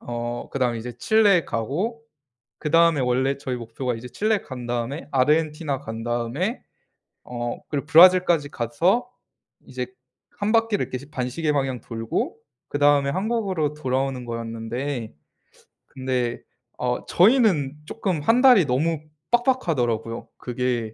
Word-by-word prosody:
어. 120 0 -5
그다음에 125 -4 0
이제 120 +1 -7
칠레에 205 - +4
가고 175 - -3 0.6
그다음에 165 -1 +3
원래 130 +2 +1
저희 130 -2 -3
목표가 120 +2 -4
이제 115 +2 -8
칠레 215 - +1
간 125 -3 -8
다음에 120 +6 -3
아르헨티나 150 +1 +1
간 110 -4 -6
다음에 120 - -2 0.6
어 120 -1 -4
그리고 145 -1 -3
브라질까지 170 -2 +6
가서 170 - +1 0.6
이제 - - -4 0.5
1 205 +1 0
바퀴를 225 -3 +2
이렇게 130 +2 -4
반시계 150 +3 -1
방향 135 -4 -1
돌고 115 -1 -3 0.3
그다음에 145 -1 +3
한국으로 190 -5 -1
돌아오는 130 -2 -2
거였는데 115 - -4 0.7
근데 130 -3 -2 0.4
어 125 0 -2
저희는 180 - +3
쪼끔 185 -2 -2
1 230 +10 +3
달이 250 - +7
너무 150 +5 0 0.3
빡빡하더라고요. 140 - 0
그게 120 -3 -2
140 Hz, 295 characters per minute, -24 LUFS, 120-170 Hz, 0.7 s, 달이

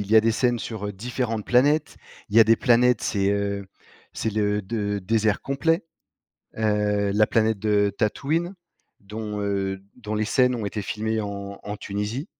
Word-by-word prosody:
il 100 0 -5
y 110 - +6
a - - +9
des 115 +1 +2
scènes 120 +1 +1
sur, 110 -2 -5
heu, 105 - -4
différentes 115 +1 -3
planètes. 145 +5 +3 0.3
Il 105 - -2
y - - +9
a - - +9
des 115 +1 +5
planètes, 120 -1 +3
c'est, 100 -2 +1
heu, 100 -1 -1 0.5
c'est 110 - -2
le 105 0 0
de 105 0 -2
désert 110 +2 +1
complet. 165 +6 0 0.7
Heu, 105 -2 +1
la 105 +1 +4
planète 110 -2 +1
de 105 -1 +2
Tatooine, 155 - 0 0.5
dont, 105 +1 -6
heu, 95 -1 -2
dont 110 -3 -5
les 110 0 0
scènes 125 +2 +3
ont 110 - -4
été 105 +1 -3
filmées 110 +2 -2
en 100 -1 -6
en 105 0 -5
Tunisie. 105 - -4
110 Hz, 180 wpm, -24 LUFS, 100-115 Hz, 0.7 s, a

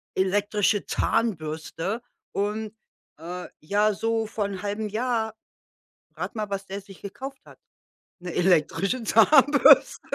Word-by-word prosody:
elektrische 205 +1 +1
Zahnbürste.“ 180 -1 -2 0.3
Und, 210 +2 -2 0.5
äh, 180 +2 -7
ja, 205 +7 +1
so 225 +2 -1
vor 215 -1 -3
'n 195 -2 -5
1/2 205 +1 -3
Jahr, 220 0 -1 0.8
rate - - -5
mal, 210 -1 -3
was 195 0 -4
der 195 +1 -6
sich 195 -1 -15
gekauft 265 +7 -8
hat, - - -16 0.6
'ne 175 -1 -7
elektrische 185 +6 +1
Zahnbürste. 285 +6 +6
205 Hz, 120 wpm, -25 LUFS, 190-220 Hz, 0.8 s, Zahnbürste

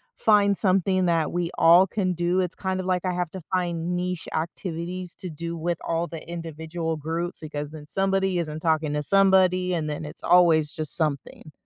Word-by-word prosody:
find 205 -2 +4
something 185 -1 +2
that 165 -3 +1
we 175 -1 -1
all 175 +3 +6
can 185 -1 -1
do 175 +2 0
it's 180 -1 -2
kind 190 -1 -2
of, 185 - -4
like, 185 -1 0
I 185 - +1
have 175 -2 -2
to 190 - -7
find 175 -1 -1
niche 180 -1 -3
activities 170 +2 -4
to 185 - -7
do 170 +2 -5
with 170 +1 -1
all 165 +1 -1
the 165 -2 -9
individual 165 0 -4
groups, 165 +3 -4
because 150 -1 -5
then 155 -2 -10
somebody 195 0 +1
isn't 155 -2 -3
talking 155 -2 +1
to 150 0 -1
somebody, 185 0 +4
and 160 -3 -1
then 150 +1 -4
it's 150 - -7
always 165 -4 +4
just 155 -3 -3
something. 155 -1 -3
175 Hz, 190 wpm, -25 LUFS, 160-185 Hz, -, all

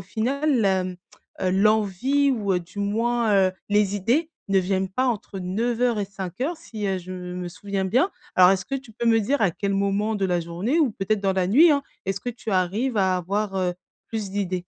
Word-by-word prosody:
final, 250 - 0
hem, 185 -2 +1 0.4
heu, 185 - +1
l'envie 215 +8 +2
ou 210 -6 0
heu, 180 - +1
du 175 +4 -13
moins, 225 +2 +1 0.2
heu, - - -6 0.2
les 205 -1 +2
idées 250 - +1 0.2
ne 195 - +4
viennent 190 +1 -1
pas 225 +8 -1
entre 220 -5 -2
9:00 230 +5 0
et 200 - -2
17:00 200 - -4
si, 225 -10 -6
heu, 190 -1 0
je 185 +1 -8
me 180 -1 -5
souviens 195 +2 -3
bien. 250 - +2 0.2
Alors 180 -1 +7
est-ce 190 -1 +1
que 275 - -4
tu 260 -4 -11
peux 235 - -4
me 225 -1 +5
dire 245 +4 0
à 195 - +4
quel 200 +4 -2
moment 200 +2 0
de 200 -2 -1
la 180 -2 +1
journée 180 - -1
ou 290 -6 +3
peut-être 210 0 -1
dans 195 -1 +1
la 185 -1 +1
nuit, 295 - +6
hein, 285 -1 +2 0.2
est-ce 195 0 -1
que 245 - -3
tu 230 -2 -7
arrives 200 +7 0
à 190 -2 +2
avoir, 200 +3 -2
heu, 180 -2 0 0.3
plus 215 -4 -4
d'idées? 185 -3 -2
200 Hz, 210 wpm, -24 LUFS, 185-235 Hz, 0.4 s, Alors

